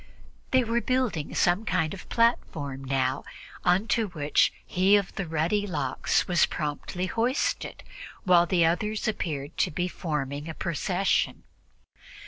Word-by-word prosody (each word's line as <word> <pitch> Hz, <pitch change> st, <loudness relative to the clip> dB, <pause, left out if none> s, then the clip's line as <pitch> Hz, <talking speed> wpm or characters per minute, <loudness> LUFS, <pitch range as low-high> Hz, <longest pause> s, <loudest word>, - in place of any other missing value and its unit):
They 260 Hz, -1 st, +4 dB
were 235 Hz, +1 st, 0 dB
building 250 Hz, -, -1 dB
some 175 Hz, +5 st, +3 dB
kind 160 Hz, -7 st, 0 dB
of 190 Hz, -, -9 dB
a -, -, -23 dB
platform 145 Hz, -, 0 dB
now, 130 Hz, 0 st, 0 dB, 0.4 s
on 180 Hz, +5 st, +3 dB
to 225 Hz, -2 st, +2 dB
which 150 Hz, -5 st, +2 dB
he 190 Hz, +3 st, +4 dB
of 200 Hz, -2 st, 0 dB
the 195 Hz, -, -4 dB
ruddy 165 Hz, +6 st, 0 dB
locks 145 Hz, -8 st, 0 dB
was 175 Hz, -3 st, +4 dB
promptly 150 Hz, +4 st, -3 dB
hoisted, 230 Hz, +8 st, -1 dB, 0.4 s
while 175 Hz, -2 st, +5 dB
the 170 Hz, -2 st, +3 dB
others 210 Hz, +7 st, 0 dB
appeared 150 Hz, -9 st, -3 dB
to -, -, +3 dB
be 175 Hz, +4 st, -1 dB
forming 150 Hz, -4 st, -3 dB
a 160 Hz, -, -6 dB
procession. 180 Hz, +2 st, 0 dB
175 Hz, 140 wpm, -27 LUFS, 150-205 Hz, 0.4 s, while